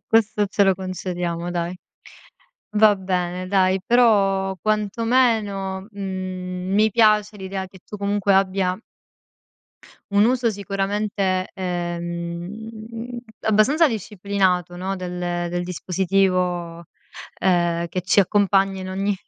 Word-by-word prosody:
Questo 215 -2 +3
ce 200 +1 +2
lo 195 - +4
concediamo, 180 -2 -4
dai. 175 +1 -3 1.0
Va 210 -1 +6
bene 185 -1 -2
dai, 190 -1 +2
però 195 -5 +3
quantomeno, 215 -3 +1
mhmm, 185 -1 -4
mi 215 +2 +4
piace 215 -1 +3
l'idea 190 0 -5
che 190 0 -16
tu 210 - -8
comunque 200 0 +1
abbia 190 0 +1 1.3
un 200 +1 +4
uso 245 0 +2
sicuramente, 195 -1 -1
ehm, 180 +7 -5 0.2
abbastanza 220 +10 +4
disciplinato, 195 - -1
no, 190 +2 -3
del 180 -1 -5 0.3
del 175 0 -2
dispositivo, 180 -1 0 0.5
ehm, 175 -2 +1
che 185 - -2
ci 185 +3 +1
accompagna 195 -1 +3
in 185 - -6
ogni 195 +2 -1
195 Hz, 105 wpm, -22 LUFS, 180-210 Hz, 1.3 s, Va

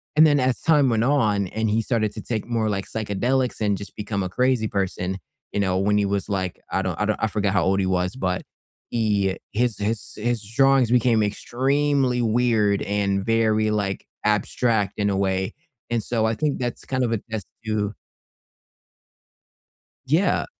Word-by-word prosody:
And 155 +1 +7
then 145 -2 +4
as 130 -1 +1
time 150 -5 +4
went 115 0 +2
on, 110 -8 +2
and 110 +1 -1
he 110 +2 +2
started 110 -3 0
to - - -6
take 110 -3 -3
more, 115 -2 0
like, 100 -1 -2
psychedelics, 120 +5 -1
and 105 -2 +1
just 100 - -9
become 100 -2 -3
a 90 - -3
crazy 125 +1 +1
person, 95 -2 -2 0.3
you 105 - 0
know, 95 -1 +1
when 105 +2 +2
he 100 - +2
was, 100 +1 -2
like 95 -3 -2
I - - +1
don't - - -3
I - - +2
don't - - -1
I - - +4
forgot 105 -2 0
how 95 - +3
old 95 +1 +2
he 95 - +1
was, 90 +1 0
but 90 -8 -1 0.5
he 105 -4 +1 0.2
his 115 -1 +1
his 105 +2 -2
his 115 0 -1
drawings 135 +3 +3
became 120 -2 +4
extremely 130 +4 +1
weird, 110 -3 +2
and 100 -1 0
very, 110 -1 +2
like, 100 -2 -2 0.2
abstract 105 0 +1
in 100 0 +2
a - - 0
way, 95 +1 0 0.4
and 115 - +1
so 115 -1 0
I 110 - +1
think 145 +4 0
that's 120 -1 -4
kind 130 -1 -1
of 115 - -2
a 110 - 0
test 110 -3 -3 0.2
to 105 -1 -1 2.1
Yeah. 160 +9 +2
110 Hz, 185 wpm, -23 LUFS, 100-120 Hz, 2.1 s, And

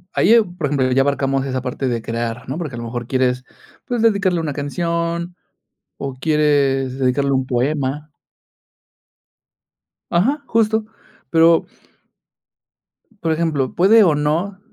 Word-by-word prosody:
Ahí, 225 +4 +5
ah, 230 - +6
por 175 -5 -4
ejemplo, 135 -2 0
ya 135 +1 +3
abarcamos 135 -1 0
esa 130 -1 -3
parte 130 +1 -3
de 115 -2 -2
crear, 115 0 -4
¿no? 140 +6 -4
Porque, 150 -8 -5
a - - -7
lo 120 - -5
mejor, 120 0 -5
quieres, 130 -1 0 0.4
pues, 240 -2 -1
dedicarle 195 -5 +2
una 150 -3 -3
canción, 170 +3 -2 0.6
o 135 -1 -5
quieres 135 -2 +1
dedicarle 135 +2 +1
un 130 -1 +1
poema. 140 +3 -1 2.0
Ajá, 270 - +1
justo. 220 -1 +1 0.4
Pero. 165 0 +4 1.6
Por 165 - +1
ejemplo, 155 -5 -1
puede 210 +5 +5
o 165 -5 +3
no 165 +7 -1
145 Hz, 135 wpm, -19 LUFS, 130-170 Hz, 2.0 s, ah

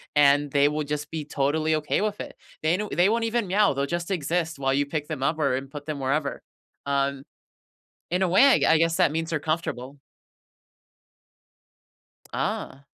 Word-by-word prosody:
and 145 0 +4
they 145 +1 +4
will 150 +1 -1
just 150 +1 -4
be 160 -2 -4
totally 155 +2 0
okay 150 +3 -1
with 210 -1 -2
it, - - -8 0.3
they 160 +4 +2
know 210 - -3
they 180 +4 +3
won't 230 +1 +1
even 230 -2 0
meow, 200 -2 +3
they'll 140 +1 -1
just 170 +3 -3
exist 165 -3 -1
while 135 0 +1
you 140 +1 +1
pick 150 0 -4
them 150 -4 -4
up 155 +3 0
or 140 -4 +2
and 135 +1 -5
put 145 -1 -8
them 150 -2 -4
wherever, 140 +2 -1 0.4
um, 140 -1 -1 0.9
in 180 +2 0
a 185 - +2
way, 195 +9 +5
I 275 - +6
g - - +1
I 160 - +5
guess 165 0 +2
that - - +3
means 160 +1 -2
they're 165 - 0
comfortable. 145 -4 -3 2.3
Ah. 140 +1 -3
155 Hz, 190 wpm, -25 LUFS, 140-170 Hz, 2.3 s, I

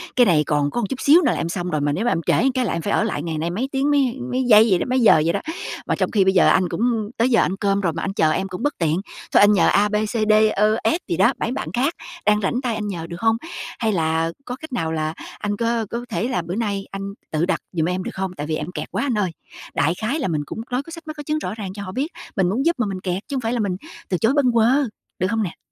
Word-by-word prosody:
Cái 245 - +6
này 160 -7 +4
còn 145 -1 0
có 240 - -1
một 205 - -1
chút 260 - -4
xíu 310 +5 +6
nữa - - +2
là - - -2
em 165 - -2
xong 180 0 -3
rồi, 155 -3 -1
mà 145 0 +1
nếu 195 +11 -1
mà 245 - +2
em 165 - 0
trễ 270 - +3
cái 255 -1 0
là - - -1
em 170 - -2
phải 205 - -1
ở - - +3
lại 190 -9 -2
ngày 160 -2 -3
nay 165 +2 -1
mấy 235 +10 -2
tiếng 275 +2 +1
mấy 270 -3 +2
mấy 255 +1 +1
giây 220 -2 +7
vậy 185 -3 +3
đó - - -1
mấy 255 +1 +2
giờ 210 -9 +6
vậy 170 - +2
đó. - - 0 0.5
Mà - - +1
trong - - -1
khi 200 -3 +4
bây 190 - +3
giờ 185 - +5
anh 185 -2 +3
cũng 225 -1 0
tới 235 +3 +3
giờ 235 - +4
ăn 190 - 0
cơm 200 0 +1
rồi, 170 -4 0
mà 165 - -4
anh 195 - -2
chờ 155 -5 +3
em 190 +5 -1
cũng 180 -1 -6
bất 290 0 +1
tiện. 165 +1 +1 0.3
Thôi - - +6
anh 205 - +7
nhờ 190 - +4
A, 205 +1 +3
B, 210 - -2
C, 210 0 0 0.2
D, - - +7 0.2
Ơ, 215 +2 +3
S 325 - +2
gì 170 - -1
đó, 195 - +4
bấy 225 - -1
bạn 270 - -3
khác 270 +7 +1 0.3
đang 210 0 +3
rảnh 245 +6 0
tay 240 -3 -1
anh 210 -1 -3
nhờ 170 -4 -4
được 170 +1 -7
hông? 225 0 +3 0.4
Hay 220 -2 +1
là 165 -1 +1
có 250 - -4
cách 315 +2 -11
nào 160 -6 -1
là 155 0 -1 0.3
anh 205 0 -2
có 230 0 0
có 240 +1 -4
thể 230 - -1
là 250 -9 -1
bữa 170 +3 -5
nay 205 -3 -2
anh 195 0 -5 0.2
tự 155 +2 +1
đặt 190 - 0
dùm 165 -3 0
em 185 +1 -2
được - - -5
không? 190 -1 -2
Tại 145 - -4
vì 155 - -1
em 155 +4 -4
kẹt - - -6
quá - - -1
anh 250 -6 0
ơi!" 190 -4 0 0.4
Đại 160 - +2
khái 250 +9 -1
là 280 - -1
mình 155 -4 -1
cũng 220 - -6
nói 250 +2 0
có 330 - -12
sách 330 -1 -10
mách 310 0 -6
có 295 - -6
chứng 305 +1 -1
rõ 185 - -4
ràng 215 -3 -6
cho 200 - -6
họ 185 - -6
biết 265 +7 -1 0.3
mình 185 -3 +2
muốn 245 +8 0
giúp 340 +1 +3
mà 240 - +2
mình 190 -1 -4
kẹt, 185 +1 -2
chứ 280 - -4
hông 260 - -1
phải 225 +1 -1
là 245 - -1
mình 200 -4 0 0.3
từ 180 - +1
chối 225 +7 +2
bâng 280 -4 +3
quơ, 230 -1 +4 0.5
được 185 - +1
không 220 +1 0
nè? 180 - -5
205 Hz, 320 wpm, -22 LUFS, 175-245 Hz, 0.5 s, giây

